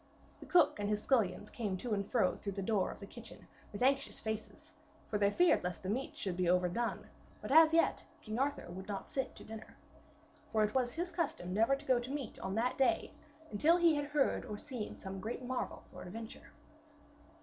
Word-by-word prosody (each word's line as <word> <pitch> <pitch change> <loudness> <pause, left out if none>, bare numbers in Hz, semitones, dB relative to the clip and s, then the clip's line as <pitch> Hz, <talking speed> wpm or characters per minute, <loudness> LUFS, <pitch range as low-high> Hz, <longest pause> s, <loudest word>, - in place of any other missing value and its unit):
The - - -11
cook 345 -10 +4
and 205 0 -1
his 210 0 0
scullions 210 -6 +1
came 205 -6 -2
to 230 +4 -3
and 200 -1 +1
fro 220 -8 +3
through 200 - -5
the 195 0 -3
door 205 -1 +1
of - - -8
the 200 - -7
kitchen 230 +3 -12 0.3
with 205 +4 -3
anxious 275 +1 +2
faces, 220 0 -5 0.4
for 210 - -1
they 200 0 +4
feared 350 - +4
lest 180 +1 -4
the 185 - -3
meats 260 +5 -3
should 190 -3 -2
be 180 -1 +1
overdone, 180 +6 +1 0.3
but - - -6
as 320 +1 +8
yet 330 +1 +3 0.2
King 215 +2 -4
Arthur 285 +1 0
would 190 +2 -7
not 200 -2 -5
sit 265 -1 -2
to - - -11
dinner. 220 0 -10 0.7
For 220 -1 +3
it 210 - 0
was 250 -2 +1
his 350 +2 -3
custom 310 - -2
never 225 +7 +4
to 280 +2 -11
go 255 -3 +4
to 240 +1 -6
meat 275 -4 -4
on 190 +1 -3
that 245 +4 0
day 270 +6 +2 0.4
until 305 +12 +4
he 340 -2 +5
had 290 -1 0
heard 290 -1 +1
or 210 -4 -6
seen 245 -2 -6
some 190 0 -6
great 235 +4 -4
marvel 255 0 -3
or - - -9
adventure. 225 +5 -8
225 Hz, 210 wpm, -34 LUFS, 200-275 Hz, 0.7 s, as